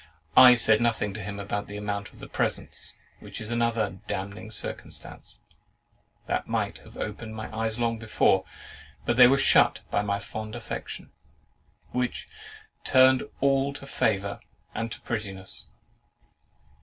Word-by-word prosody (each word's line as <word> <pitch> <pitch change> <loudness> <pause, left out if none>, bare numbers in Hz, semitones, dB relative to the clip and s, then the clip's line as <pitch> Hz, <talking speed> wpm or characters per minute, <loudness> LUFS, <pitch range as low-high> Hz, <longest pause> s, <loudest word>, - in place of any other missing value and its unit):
I 125 -1 +10
said 110 -2 +4
nothing 110 -3 +1
to 105 - -6
him 100 +1 -5
about 100 +1 -3
the 105 - -7
amount 105 0 -4
of - - -18
the - - -9
presents; - - -3 0.2
which - - -9
is 110 +1 -6
another 115 -6 0
damning 100 +4 -4
circumstance, 110 - -7 0.8
that - - -1
might - - -1
have - - -15
opened 110 +1 -5
my 110 0 -6
eyes 110 0 -1
long 115 -1 0
before; 110 -1 +3 0.6
but - - +1
they 125 0 +9
were 135 +2 +4
shut 135 - +5
by 100 - +2
my 100 -1 0
fond 110 +2 -6
affection, 120 -1 -6 0.8
which 125 -1 -2 0.6
"turned 130 -1 +6 0.2
all 140 0 +2
to 140 - -9
favour 100 -6 0 0.3
and 115 0 -3
to - - -6
prettiness." 95 - -4
110 Hz, 145 wpm, -27 LUFS, 105-120 Hz, 0.8 s, I